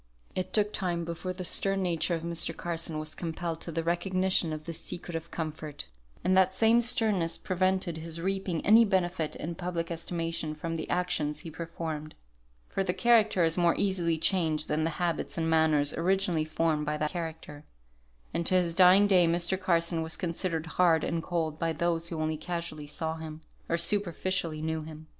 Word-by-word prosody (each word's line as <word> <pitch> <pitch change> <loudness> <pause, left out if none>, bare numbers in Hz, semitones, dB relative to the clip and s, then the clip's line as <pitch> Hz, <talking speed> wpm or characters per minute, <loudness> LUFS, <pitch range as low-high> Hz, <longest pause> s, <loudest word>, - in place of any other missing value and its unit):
It 185 0 -3
took 210 0 +2
time 175 -3 -1
before 170 +2 -4
the 185 0 -5
stern 195 +2 +1
nature 170 0 +1
of 165 - -5
Mr. 170 0 -1
Carson 165 -2 -2
was 155 0 -3
compelled 165 -1 -4
to 170 - -5
the 165 +1 -2
recognition 185 0 +1
of 155 0 -5
this 165 -1 -5
secret 175 -1 -6
of 165 0 -5
comfort, 155 - -5 0.4
and 185 +1 +3
that 190 0 +4
same 225 +3 +5
sternness 215 -8 +2
prevented 185 -2 0
his 165 +1 -5
reaping 190 -2 -2
any 225 +3 +8
benefit 180 -6 0
in 170 +3 -4
public 170 -1 -3
estimation 165 -2 -2
from 165 +2 -4
the 160 - -5
actions 150 -4 0
he 165 - -8
performed; 160 -1 -5 0.5
for 195 - -1
the 180 -1 -1
character 220 -6 +4
is 165 +2 +2
more 170 -1 +4
easily 175 -4 +1
changed 160 -3 +1
than 155 +1 +1
the - - +1
habits 175 -2 -1
and 165 -1 0
manners 155 -2 +3
originally 180 -2 +1
formed 155 -1 0
by 150 0 -1
that 150 0 -1
character, 160 -3 -6 0.7
and 170 - 0
to 185 - +4
his 175 -2 +2
dying 185 +3 +7
day 185 -4 +5
Mr. 170 +2 +2
Carson 170 -2 +1
was 160 0 -2
considered 165 -2 -2
hard 165 -1 +3
and 165 - -1
cold 160 -3 -2
by 165 0 0
those 165 +1 0
who 165 -2 -4
only 155 0 -1
casually 165 -2 -5
saw 160 +2 -3
him, 160 -1 -8 0.3
or 170 - +2
superficially 175 -3 -1
knew 160 0 -1
him. 155 0 -10
170 Hz, 185 wpm, -29 LUFS, 160-180 Hz, 0.7 s, any